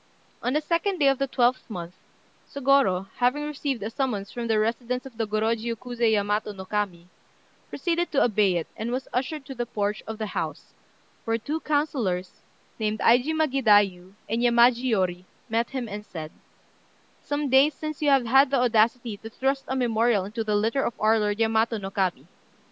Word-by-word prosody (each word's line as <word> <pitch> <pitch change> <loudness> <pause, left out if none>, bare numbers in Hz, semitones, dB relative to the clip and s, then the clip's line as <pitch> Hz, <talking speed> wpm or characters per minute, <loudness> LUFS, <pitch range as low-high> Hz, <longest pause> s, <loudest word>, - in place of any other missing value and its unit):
On 250 +2 -1
the 305 +1 +1
2d 340 +5 0
day 290 -4 +3
of 275 -1 +1
the 275 - 0
12th 250 -1 +1
month, 175 -4 -6 0.6
Sôgorô, 265 -9 +2
having 250 +4 +1
received 280 -6 -3
a 215 - -4
summons 220 -6 -2
from 240 -1 -4
the 220 -1 +2
residence 240 +3 -1
of 265 -3 -11
the 225 -1 -2
Gorôjiu 225 +2 -1
Kuzé 240 -1 -1
Yamato 210 0 0
no 190 -1 -9
Kami, 185 -4 -3 0.6
proceeded 345 0 -1
to 280 - +3
obey 210 -5 +2
it, 170 - -1
and 220 +2 -4
was 255 +2 -3
ushered 270 +3 -2
to 270 - -7
the 240 -2 -4
porch 210 0 -2
of 220 0 -5
the 215 - -3
house, 165 -6 -5 0.5
where 225 0 0
two 295 +8 -3
councillors, 265 - -1 0.4
named 215 0 -1
Aijima 290 +9 +3
Gidaiyu 205 -7 +3
and 225 +3 -1
Yamaji 240 +1 +4
Yôri, 185 -5 0 0.3
met 230 +1 0
him, 260 -3 -4
and 210 0 -6
said 160 -6 -8 0.9
"Some 290 0 -2
days 270 +3 +5
since 310 -1 -6
you 295 - +3
had 270 0 +5
the 275 - +1
audacity 235 -1 +2
to 225 - -10
thrust 270 +4 -1
a 265 - -2
memorial 230 -5 +2
into 220 +3 -4
the 210 -1 0
litter 225 +6 +1
of 235 - -2
our 220 +1 +3
lord 210 0 -1
Yamato 225 0 +2
no 195 -2 -6
Kami. 190 -3 -1
230 Hz, 180 wpm, -25 LUFS, 210-265 Hz, 0.9 s, days